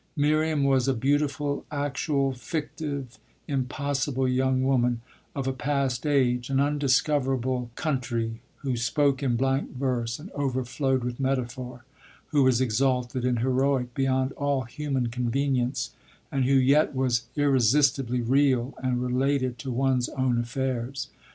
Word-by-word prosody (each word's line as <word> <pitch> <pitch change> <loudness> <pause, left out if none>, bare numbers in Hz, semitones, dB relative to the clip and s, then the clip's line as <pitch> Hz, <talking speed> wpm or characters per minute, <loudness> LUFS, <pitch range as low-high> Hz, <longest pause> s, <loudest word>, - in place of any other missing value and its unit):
Miriam 155 0 +2
was 135 -2 +3
a 135 - +2
beautiful, 145 +3 0
actual, 140 -1 -1
fictive, 140 0 -5 0.3
impossible 135 0 -1
young 130 0 +1
woman 125 -3 +2 0.3
of 135 -2 -2
a 135 - 0
past 135 0 -1
age, 125 -3 +2
an 135 0 +1
undiscoverable 135 -3 +1
country, 120 -6 -2 0.2
who 130 -3 0
spoke 135 +4 +1
in 130 -4 +1
blank 135 +1 0
verse 125 -3 -1
and 170 +7 -11
overflowed 130 -1 -1
with 120 +1 -4
metaphor, 125 -2 -3 0.4
who 145 - +3
was 130 -2 +4
exalted 125 0 0
and 125 -2 +1
heroic 130 -1 +1
beyond 130 0 +1
all 140 -2 -1
human 135 0 -2
convenience 125 +1 -1 0.4
and 135 -2 +1
who 135 +2 +3
yet 135 +3 +4
was 125 -2 0
irresistibly 135 -2 +3
real 130 0 +2
and 125 -1 0
related 130 0 0
to 135 - -5
one's 130 0 +1
own 130 -2 0
affairs. 130 +1 -3
130 Hz, 130 wpm, -26 LUFS, 125-140 Hz, 0.4 s, was